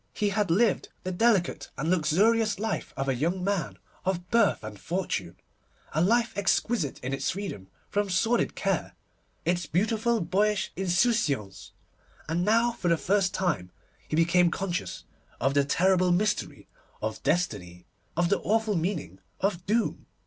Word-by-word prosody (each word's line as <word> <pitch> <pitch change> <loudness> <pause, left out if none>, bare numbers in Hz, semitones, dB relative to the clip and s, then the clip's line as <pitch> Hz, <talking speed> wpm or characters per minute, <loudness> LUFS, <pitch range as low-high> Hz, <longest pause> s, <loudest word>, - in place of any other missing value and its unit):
He 210 - +1
had 200 -1 0
lived 215 +7 +2
the 185 - -3
delicate 195 -1 +1
and 155 +5 -1
luxurious 205 +6 +3
life 220 +2 -3
of 135 - -2
a 135 - +2
young 170 +8 -1
man 175 - -1 0.3
of 180 -1 -2
birth 225 - +3
and 105 -2 -8
fortune, 110 - -3 0.6
a 155 - +1
life 235 +6 +2
exquisite 200 - 0
in 130 +2 -2
its 135 - -1
freedom 185 - -5 0.2
from 205 -1 -1
sordid 225 +6 +1
care, - - -1 0.5
its 175 -2 0
beautiful 220 +7 +1
boyish 200 +4 +1
insouciance; 180 - 0 0.6
and 165 +2 0
now 230 +4 +3
for 205 - -4
the 170 -1 +4
first 195 +1 +1
time 160 - -1 0.4
he - - -2
became 170 +2 +4
conscious 180 0 -3 0.4
of 135 - +1
the 140 0 +4
terrible 180 +5 +3
mystery 210 +4 0 0.3
of - - -4
Destiny, 90 - -1 0.3
of 175 0 +2
the 200 - +2
awful 220 -1 +1
meaning 160 - -2 0.2
of 190 -3 -1
Doom. 225 +3 0
180 Hz, 150 wpm, -27 LUFS, 160-210 Hz, 0.6 s, the